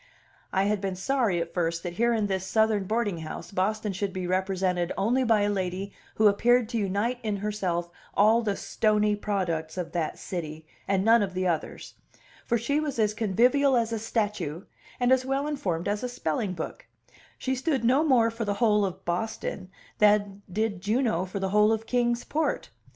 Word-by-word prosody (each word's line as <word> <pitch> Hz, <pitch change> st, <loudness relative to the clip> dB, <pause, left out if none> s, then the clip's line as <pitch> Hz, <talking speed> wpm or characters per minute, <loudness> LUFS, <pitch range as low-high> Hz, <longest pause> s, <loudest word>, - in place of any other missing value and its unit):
I 190 Hz, -, +2 dB
had 205 Hz, 0 st, 0 dB
been 195 Hz, -2 st, -2 dB
sorry 205 Hz, -2 st, +1 dB
at 170 Hz, 0 st, -4 dB
first 165 Hz, -1 st, -1 dB
that 175 Hz, -, -4 dB
here 235 Hz, +6 st, +2 dB
in 220 Hz, -3 st, +1 dB
this 190 Hz, -2 st, -1 dB
Southern 220 Hz, -1 st, +2 dB
boarding 210 Hz, -4 st, -1 dB
house 160 Hz, +2 st, -7 dB
Boston 210 Hz, +2 st, -1 dB
should 195 Hz, +1 st, -2 dB
be 185 Hz, -1 st, -4 dB
represented 185 Hz, -1 st, 0 dB
only 240 Hz, +7 st, +2 dB
by 225 Hz, -3 st, +3 dB
a 205 Hz, -, +2 dB
lady 190 Hz, 0 st, -3 dB, 0.2 s
who 220 Hz, -, +2 dB
appeared 240 Hz, +3 st, +3 dB
to 235 Hz, -2 st, -1 dB
unite 205 Hz, +5 st, -1 dB
in 215 Hz, -2 st, -2 dB
herself 185 Hz, -4 st, -2 dB, 0.2 s
all 220 Hz, +3 st, +5 dB
the 205 Hz, -3 st, -1 dB
stony 210 Hz, -1 st, +1 dB
products 180 Hz, -6 st, -2 dB
of 170 Hz, -2 st, -3 dB
that 165 Hz, -3 st, -2 dB
city, 160 Hz, -4 st, -6 dB, 0.2 s
and 195 Hz, 0 st, +1 dB
none 230 Hz, 0 st, +6 dB
of 190 Hz, -2 st, -2 dB
the 185 Hz, 0 st, 0 dB
others; 165 Hz, -3 st, -3 dB, 0.5 s
for 235 Hz, -, +2 dB
she 280 Hz, +6 st, 0 dB
was 300 Hz, -4 st, -3 dB
as 215 Hz, -2 st, +2 dB
convivial 245 Hz, +6 st, +3 dB
as 230 Hz, -1 st, 0 dB
a 225 Hz, -, -1 dB
statue 210 Hz, -7 st, -2 dB, 0.4 s
and 245 Hz, 0 st, +2 dB
as 260 Hz, 0 st, +4 dB
well 270 Hz, +2 st, -1 dB
informed 195 Hz, -, -2 dB
as 205 Hz, +1 st, -1 dB
a 250 Hz, -, -3 dB
spelling 190 Hz, -4 st, -2 dB
book; 185 Hz, -, -7 dB, 0.5 s
she 260 Hz, -, -2 dB
stood 265 Hz, -1 st, -1 dB
no 260 Hz, +6 st, +4 dB
more 245 Hz, -7 st, +4 dB
for 230 Hz, +1 st, -4 dB
the 205 Hz, -2 st, -1 dB
whole 210 Hz, -2 st, +3 dB
of 190 Hz, -1 st, -4 dB
Boston 185 Hz, +1 st, -3 dB, 0.3 s
than 205 Hz, -1 st, +3 dB
did 210 Hz, -1 st, -1 dB
Juno 215 Hz, -3 st, +1 dB
for 190 Hz, +1 st, -6 dB
the 190 Hz, 0 st, -1 dB
whole 210 Hz, +2 st, +4 dB
of 225 Hz, 0 st, -1 dB
Kings 240 Hz, 0 st, +1 dB
Port. 315 Hz, +1 st, -2 dB
205 Hz, 190 wpm, -27 LUFS, 185-230 Hz, 0.5 s, none